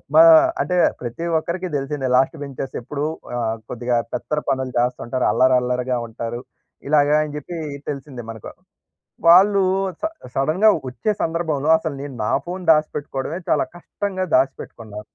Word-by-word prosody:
మా 325 - +9 0.4
అంటే, 180 - 0 0.2
ప్రతి 125 +7 -5
ఒక్కరికి 175 +3 -4
దెలిసిందే, 135 -1 -3
లాస్ట్ 130 - +1
బెంచెస్ 135 -1 -6
ఎప్పుడు 140 +4 -5 0.3
ఆహ్, 115 -1 -1
కొద్దిగా 120 0 -1 0.2
పెత్తర 150 - -2
పనులు 130 -1 -1
జేస్తుంటరు, 125 +1 -1
అల్లరి 130 0 +4
అల్లరిగా 125 0 -1
ఉంటారు, 115 +1 -5 0.5
ఇలాగా 145 0 +4
అని 150 -1 -6
చెప్పి 170 +4 -6 0.3
తెలిసిందే 135 -3 -8
మనకు. 110 -2 -9 0.8
వాళ్ళు 195 +3 +7 0.4
స - - -3 0.3
సడెన్‌గా 155 +10 +3 0.2
వచ్చే 130 - -2
సందర్భంలో, 160 -3 -1
అసలు 160 -2 -4
నేను 140 -2 -7
నా - - 0
ఫోన్ 180 +2 -5
దాసిపెట్టుకోవడమే 150 0 -2
చాలా - - +3
కష్టంగా 185 +2 -4
దాసిపెట్టుకున్నా 115 -5 -3
140 Hz, 135 wpm, -21 LUFS, 125-165 Hz, 0.8 s, మా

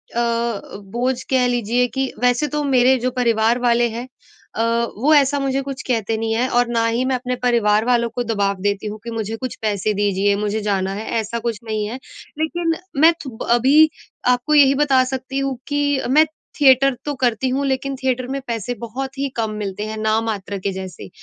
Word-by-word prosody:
अ, 235 -3 -1 0.2
बोझ 250 +1 -1
कह 260 -2 +3
लीजिए 245 0 +1
कि 265 0 -1
वैसे 250 +4 +2
तो 295 - 0
मेरे 260 -2 +4
जो 255 +1 -1
परिवार 235 -1 +2
वाले 240 -1 +3
हैं 235 +3 -6 0.5
अ, - - -1 0.4
वो 285 +8 +3
ऐसा 285 0 +3
मुझे 275 0 0
कुछ 270 -1 -5
कहते 225 -2 0
नहीं 225 0 -1
है 245 +3 +1
और 245 0 +3
ना 230 -1 +1
ही 235 +3 0
मैं 260 - +1
अपने 250 0 -2
परिवार 220 -3 +3
वालों 235 -1 +2
को 245 - -1
दबाव 200 -3 -1
देती 205 +1 -1
हूँ 210 +1 -6
कि, 235 - -6
मुझे 225 -1 -3
कुछ 255 0 -5
पैसे 210 -1 0
दीजिए 200 0 +1
मुझे 210 +1 -2
जाना 195 -2 -1
है 215 +2 -5
ऐसा 225 +2 -3
कुछ 230 -2 -3
नहीं 215 -2 -2
है। 230 - -5 0.4
लेकिन 330 +1 0 0.3
मैं 330 +2 +7
थु 265 - -4
ब - - -4
अभी 275 +6 +5 0.4
आपको 250 +5 -1
यही 275 -1 +6
बता 275 -2 +3
सकती 260 +1 -4
हूँ 275 -2 -2
कि, 285 -1 +1
मैं 305 +4 +6 0.4
थिएटर 270 0 +5
तो 290 - -1
करती 245 +1 +1
हूँ 275 +2 0
लेकिन 270 0 -1
थिएटर 255 -1 0
में 275 - -3
पैसे 235 0 -3
बहुत 265 +4 -6
ही 275 0 -1
कम 225 -2 -1
मिलते 195 +1 -4
हैं 220 0 -5
नाम 220 +1 +1
मात्र 205 -2 -3
के 195 +1 -2
जैसे। 190 -1 -8
240 Hz, 205 wpm, -20 LUFS, 220-265 Hz, 0.5 s, मैं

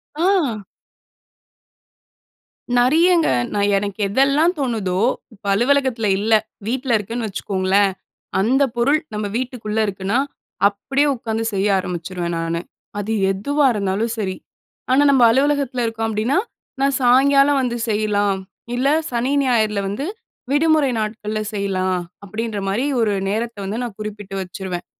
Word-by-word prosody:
ஆ. 320 - +1 2.1
நெறையங்க. 330 +7 +4 0.2
நான் 205 0 +1
எனக்கு 200 +1 -3
எதெல்லாம் 275 - +3
தோணுதோ, 210 -8 -1 0.3
இப்ப 200 - -21
அலுவலகத்தில 245 -2 +2
இல்ல, 220 +2 +1 0.3
வீட்ல 255 0 0
இருக்கேன்னு 225 +2 -4
வச்சுக்கோங்களேன். 195 0 +1 0.5
அந்தப் 260 +4 +2
பொருள் 280 +6 +3
நம்ம 210 0 -2
வீட்டுக்குள்ள 240 -4 -3
இருக்குனா, 195 +3 -1 0.5
அப்பிடியே 270 +8 0
உட்காந்து 225 -1 -3
செய்ய 195 +1 +1
ஆரம்பிச்சுருவேன் 175 -1 -4
நானு. 165 0 -2 0.4
அது 210 +2 -3 0.2
எதுவா 285 +10 0
இருந்தாலும் 205 +3 -1
சரி. 190 -3 -2 0.6
ஆனா 275 +3 +5
நம்ம 270 -2 +4
அலுவலகத்தில 270 -1 +1
இருக்கோம் 225 0 -2
அப்பிடின்னா, 225 - 0 0.4
"நான் 275 0 +2
சாயங்காலம் 275 +3 +5
வந்து 245 -2 -1
செய்யலாம். 205 -2 +1 0.4
இல்ல, 255 +3 +1 0.2
சனி, 245 +3 0
ஞாயிறுல 215 -5 +1
வந்து, 210 +9 -3 0.5
விடுமுறை 300 -2 +3
நாட்கள்ல 215 0 -3
செய்யலாம்." 185 -2 -1 0.3
அப்பிடின்றமாரி 215 +2 -2
ஒரு 215 -3 +2 0.2
நேரத்த 230 +2 -2
வந்து 210 +5 -3
நான் 230 -4 -6
குறிப்பிட்டு 205 -2 -6
வச்சுருவேன். 185 -1 -6
220 Hz, 120 wpm, -20 LUFS, 200-265 Hz, 2.1 s, ஆனா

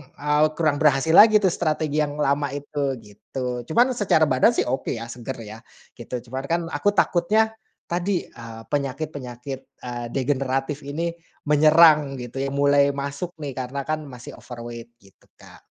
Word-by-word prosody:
eee, 150 +1 +2
kurang 155 -3 +2
berhasil 145 +1 +3
lagi 215 +1 +8
tuh 190 -3 +3
strategi 155 -2 -1
yang 145 0 -4
lama 140 +1 +1
itu 145 -1 -3
gitu 120 +4 -6
cuman 240 +10 +3
secara 185 -7 +3
badan 130 - +4
sih - - +2
oke 130 +2 -2
ya 115 - -6
seger 125 +2 -6
ya, 110 +1 -10 0.4
gitu 120 +1 -7
cuman 130 +2 -4
kan 170 +2 0
aku 175 +8 +1
takutnya, 215 +6 +2 0.4
tadi, 175 +1 -1
eee, 115 -1 -10
penyakit-penyakit, 135 -2 -4 0.2
eee, 120 -1 -5
degeneratif 135 +1 -1
ini 165 +4 -2 0.4
menyerang 150 -1 +6
gitu 120 +2 -7
ya 135 - -1
mulai 140 0 +4
masuk 140 +5 -4
nih 140 - -4
karena 130 +2 -4
kan 155 0 -2
masih 125 -2 -10
overweight 120 -1 -9
gitu, 95 -1 -24
Kak. - - -16
140 Hz, 155 wpm, -23 LUFS, 125-155 Hz, 0.4 s, lagi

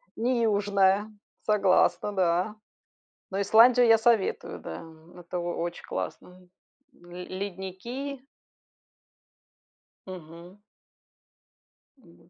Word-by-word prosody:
Не 235 0 0
южная, 205 -1 +2 0.3
согласна, 205 0 +2
да. 180 +3 +1 0.8
Но 195 - -1
Исландию 235 +4 +6
я 225 - +7
советую, 225 -3 +1
да, 80 - -8 0.3
это 175 +1 -5
о 175 0 -3
очень 170 +1 -4
классно. 180 0 -7 0.5
Ле 175 +1 -11
ледники. 200 +9 -6 1.9
Мгм. 175 +1 -11 1.4
Вот. 170 -8 -22
190 Hz, 85 wpm, -27 LUFS, 180-220 Hz, 1.9 s, я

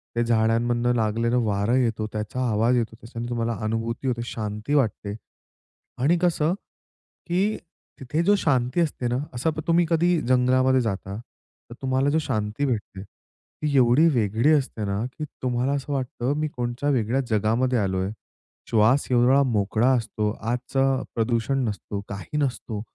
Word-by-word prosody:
ते 120 - +2
झाडांमधनं 120 +1 +2
लागलेलं 115 +2 +1
वारं 105 +3 +1
येतो, 115 -4 0
त्याचा 105 +4 -3
आवाज 115 +3 +2
येतो. 115 -1 -2
त्याच्याने 115 0 -6
तुम्हाला 115 -1 -1
अनुभूती 115 +3 -2
होते, 120 -2 -1
शांती 105 +3 -4
वाटते. 110 -6 0 0.9
आणि 165 +5 +4
कसं, 170 -2 +2 0.7
की 190 +5 +1 0.4
तिथे 150 +5 -1
जो 205 +4 +4
शांती 130 -3 +1
असते 150 -6 -1
ना, 120 +1 0 0.2
असं 130 +7 0 0.2
तुम्ही 170 +1 +4
कधी 170 0 +3
जंगलामध्ये 130 +1 +3
जाता, 100 -3 -3
तर 120 0 -18
तुम्हाला 130 +1 +1
जो 155 +2 +2
शांती 110 0 -2
भेटते, 105 -6 -3
ती 145 +7 -7
एवढी 130 +6 +5
वेगळी 115 +5 +2
असते 130 -7 0
ना, 100 +2 -1
की 155 - -3 0.2
तुम्हाला 125 +2 0
असं 145 +1 -3
वाटतं 130 -1 -2
मी 155 - 0
कोणच्या 125 0 -3
वेगळ्या 125 -1 +1
जगामध्ये 115 +4 +1
आलोय. 95 -1 -1 0.6
श्वास 115 +5 +3
एवढा 125 +3 +5
मोकळा 110 -1 +1
असतो 110 -2 -2 0.2
आजचं 130 +2 0
प्रदूषण 115 +3 0
नसतो, 105 -1 -4
काही 100 +9 -5
नसतो. 125 -6 -2
120 Hz, 145 wpm, -24 LUFS, 110-135 Hz, 0.9 s, एवढी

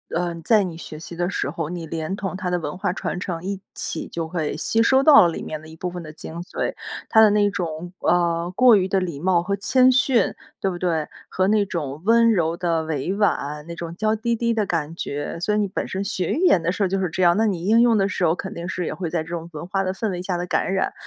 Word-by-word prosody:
呃， 175 0 -1
在 215 -3 +4
你 175 -3 -5
学 155 -2 -9
习 170 +1 -9
的 175 +1 -1
时 195 - -2
候， 160 0 -4
你 170 -2 -5
连 160 +4 -3
同 190 -2 -4
它 185 -3 -3
的 180 - +1
文 170 - -5
化 180 -1 -1
传 180 - -3
承 175 -3 -4
一 195 0 -3
起 - - -4
就 165 -1 -4
会 160 -3 -2
吸 225 +8 +1
收 265 +3 +4
到 275 - +8
里 165 - -4
面 155 - -5
的 155 - -13
一 160 - -12
部 180 +2 -4
分 175 -1 -7
的 155 - -9
精 160 +1 -8
髓。 - - -3 0.3
它 220 - +5
的 215 -2 +7
那 205 -1 +3
种， 175 -2 -4
呃， 170 0 +1
过 250 0 +7
于 190 -2 +2
的 190 0 +1
礼 170 -6 -4
貌 175 +1 +2
和 200 +3 -1
谦 255 +6 +4
逊， 260 -1 +2 0.3
对 195 - +1
不 180 - -4
对？ 165 -4 -1 0.2
和 185 0 +1
那 210 0 +3
种 150 -5 -4
温 230 +1 +5
柔 165 -5 +1
的 165 -2 0
委 155 +1 -2
婉， 150 -7 0
那 170 - -7
种 170 0 -6
娇 215 +3 +1
滴 235 +2 -1
滴 235 0 0
的 215 -2 0
感 165 -2 -2
觉， 145 0 -4
所 210 +5 0
以 - - +1
你 210 -1 +1
本 190 - -4
身 190 +1 -3
学 195 -4 -1
语 320 - -1
言 190 - +5
的 165 +2 0
时 200 - -1
候 195 - +3
就 195 +1 -1
是 185 -3 0
这 185 +3 -1
样， 175 0 +5
那 225 - +3
你 180 -4 -2
应 225 +3 +5
用 235 -2 +4
的 195 -1 +2
时 200 - -3
候 165 -1 +3
肯 190 - -6
定 170 +1 -6
是 180 -1 -3
也 - - -3
会 175 -3 -4
在 165 -2 -1
这 160 - -13
种 170 0 -5
文 155 +2 -6
化 195 +1 0
的 185 0 -1
氛 210 +2 -2
围 180 -1 -4
下 180 -1 -2
的 175 - -3
感 180 - 0
染。 190 - 0
180 Hz, 295 characters per minute, -23 LUFS, 165-200 Hz, 0.3 s, 到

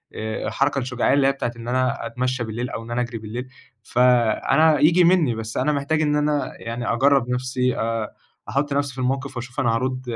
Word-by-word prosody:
الحركة 135 +6 -1
الشُجاعية 125 -1 0
اللي 140 -1 +4
هي 135 - +4
بتاعة 135 -3 -3
إن 115 0 -9
أنا 130 +1 0
أتمشّى 125 0 -2
بالليل 120 +2 -4
أو 115 - -5
إن 115 - -10
أنا 120 +1 0
أجرِي 120 -1 -4
بالليل، 115 +4 -6 0.4
فأنا 125 +6 +3
ييجي 165 +5 +5
منّي 170 -9 +3
بس 110 0 -5
أنا 150 - +2
محتاج 145 +2 0
إن 150 -1 +1
أنا 150 -1 0
يعني 115 0 -3
أجرّب 135 0 +3
نَفسي 125 0 -1
آآ، 115 -1 -2 0.3
أحُط 140 +1 -1
نفَسي 140 -2 -1
في 130 - -16
الموقِف 135 +1 -2
وأشوف 125 +2 -6
أنا 115 -3 +2
هارُد 130 +2 -2
130 Hz, 195 wpm, -22 LUFS, 120-140 Hz, 0.4 s, ييجي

